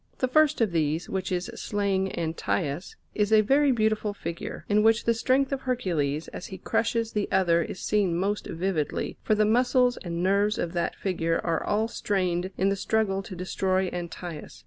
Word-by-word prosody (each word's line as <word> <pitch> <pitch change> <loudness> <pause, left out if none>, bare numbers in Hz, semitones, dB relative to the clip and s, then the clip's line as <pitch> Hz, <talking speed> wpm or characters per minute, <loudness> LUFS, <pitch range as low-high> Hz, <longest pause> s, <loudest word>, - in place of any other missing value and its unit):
The 255 - +1
first 305 +1 +3
of 220 -5 +2
these, 160 0 0
which 190 0 -3
is 180 +5 -2
slaying 200 -3 -1
Antaeus, 165 0 -2 0.2
is 210 0 0
a 215 -1 +7
very 275 +6 +3
beautiful 215 -3 0
figure, 170 -3 -6
in 210 +1 +3
which 225 +1 +4
the 230 - +3
strength 260 +4 +1
of 275 -1 -2
Hercules 165 - -1
as - - -7
he 190 - -8
crushes 230 +1 0
the 210 -1 -1
other 175 -3 +3
is 180 - -5
seen 195 -5 +1
most 200 +3 -1
vividly, 170 -3 -2
for 215 - +2
the 215 0 +3
muscles 245 +2 +3
and 170 -1 -4
nerves 200 +3 +2
of 170 0 -2
that 170 -1 -1
figure 165 -3 -1
are 165 -2 0
all 215 +2 +1
strained 185 -5 -1
in 190 +2 +2
the 195 - +1
struggle 195 -1 0
to 195 -1 -9
destroy 185 +1 0
Antaeus. 175 -2 -7
195 Hz, 185 wpm, -27 LUFS, 175-220 Hz, 0.2 s, a